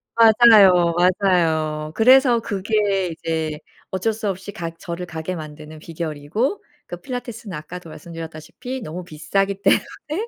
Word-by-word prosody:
맞아요, 215 -6 +6
맞아요. 165 -4 +1
그래서 255 +1 +5
그게 200 -2 0
이제 160 -2 -3 0.3
어쩔 190 +4 -1
수 215 -1 -3
없이 190 +1 -5
가 170 -4 -5
저를 170 +1 -7
가게 160 +2 -5
만드는 155 -1 -9
비결이고 165 - -3 0.2
그 - - -7
필라테스는 240 - -6
아까도 170 +3 -9
말씀드렸다시피 165 - -8
너무 175 -1 -6
비싸기 195 +5 -2
때문에 310 - 0
180 Hz, 315 characters per minute, -21 LUFS, 160-220 Hz, 0.3 s, 맞아요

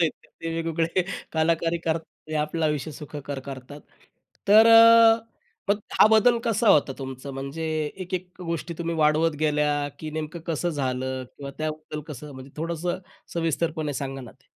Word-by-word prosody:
त्या. 165 - +4 0.3
ते 165 - -4
वेगवेगळे 165 +2 0 0.3
कलाकारी 165 +1 +1
करतात 165 -1 -2 0.2
ते 155 - -4
आपलं 155 +2 -1
आयुष्य 150 0 -2
सुखकर 145 -1 -7
करतात. 135 +2 -8 0.7
तर 220 +2 +8
अ, 230 0 +8 0.5
मग 205 +1 +3 0.2
हा - - +9
बदल 235 +2 +5
कसा 225 -1 +2
होता 145 -5 +5
तुमचा 130 0 -7
म्हणजे 135 +4 -5 0.4
एक-एक 180 0 -4
गोष्टी 170 0 -4
तुम्ही 170 0 -2
वाढवत 155 +1 +3
गेल्या, 150 -1 +1
की 155 -1 -6
नेमकं 155 +2 -5
कसं 170 +1 -1
झालं 130 -2 -2
किंवा 140 -1 -7
त्याबद्दल 155 0 -4
कसं 150 0 -8
म्हणजे 130 +1 -11
थोडंसं 170 +3 -2 0.4
सविस्तरपणे 160 -2 -1
सांगा 135 0 -5
ना 120 - -10
ते? 130 - -32
155 Hz, 150 wpm, -25 LUFS, 145-170 Hz, 0.7 s, हा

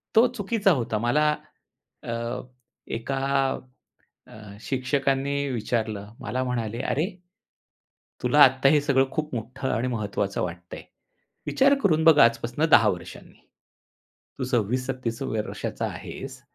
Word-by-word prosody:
तो 230 +3 +7
चुकीचा 205 -2 +1
होता. 120 -8 0
मला 145 +7 +2 0.7
अ, 115 0 -3 0.5
एका 135 +4 -3 1.1
अ, - - -17 0.3
शिक्षकांनी 135 +1 0 0.2
विचारलं. 110 -3 -3
मला 130 +1 -2
म्हणाले, 120 -3 -3
"अरे, 155 +4 0 1.2
तुला 150 - +4
आत्ता 130 +1 +5
हे 150 0 +4
सगळं 135 -2 +2
खूप 155 -1 -3
मोठं 130 +4 -4
आणि 115 +3 -1
महत्त्वाचं 105 -4 -2
वाटतंय. 85 0 -7 0.6
विचार 275 +1 +4
करून 160 -5 +3
बघ 160 -2 +7
आजपासून 120 +5 +3
10 110 - +7
वर्षांनी. 90 -3 -7 1.0
तू - - -1
26-27 125 +1 -1
वर्षाचा 110 -1 -3
आहेस - - -8
125 Hz, 110 wpm, -25 LUFS, 115-145 Hz, 1.2 s, तो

